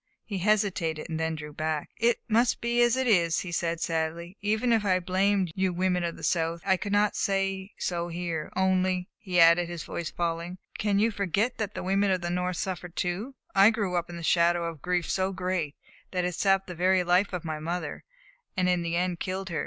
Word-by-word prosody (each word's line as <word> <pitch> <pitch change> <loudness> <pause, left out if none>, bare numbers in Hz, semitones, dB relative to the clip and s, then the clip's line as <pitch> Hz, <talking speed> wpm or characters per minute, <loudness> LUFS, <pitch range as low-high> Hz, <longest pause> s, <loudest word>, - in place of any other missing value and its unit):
He 200 -3 -4
hesitated, 180 -6 0
and 160 - -2
then 160 0 -1
drew 150 -1 -8
back. 155 0 -2
"It 235 +1 +2
must 235 +2 +2
be 235 +1 +1
as 240 +1 +4
it 260 - +1
is," 175 -8 +3
he 185 - -6
said 170 0 -1
sadly. 165 +2 -2
"Even 220 +4 +1
if 225 -2 +2
I 185 -2 +3
blamed 190 0 +1
you 190 0 +1
women 180 0 0
of 170 -1 -2
the - - -12
South, 165 -1 0
I 190 -1 +4
could 200 +2 -5
not 205 0 +3
say 195 -1 -1
so 170 -1 -2
here. 170 -2 -4
Only," 185 -1 +1
he 180 -4 0
added, 170 +1 +6
his 175 -2 -5
voice 170 -2 -4
falling, 170 +1 -3 0.2
"can 205 -1 +1
you 220 +3 +3
forget 205 +4 0
that 210 -2 -3
the - - -4
women 195 +2 +2
of 185 -2 +1
the 175 0 -2
North 180 0 -1
suffered 180 -2 -4
too? 195 +10 -2 0.2
I 195 +2 +7
grew 205 -5 -1
up 175 0 -1
in 170 - -7
the 170 - -7
shadow 170 +1 +3
of 165 -1 -4
a - - -26
grief 180 +2 -1
so 190 0 0
great 180 -5 -2 0.3
that 180 -1 -1
it 180 - -1
sapped 195 +1 +2
the 180 - -7
very 180 +2 +3
life 180 +3 +3
of 180 -3 -4
my 155 -1 -3
mother, 170 +3 -4 0.5
and 185 -1 +2
in 180 -1 +2
the 170 0 -2
end 180 0 0
killed 190 0 -3
her. 165 -3 -2
180 Hz, 225 wpm, -28 LUFS, 170-195 Hz, 0.5 s, I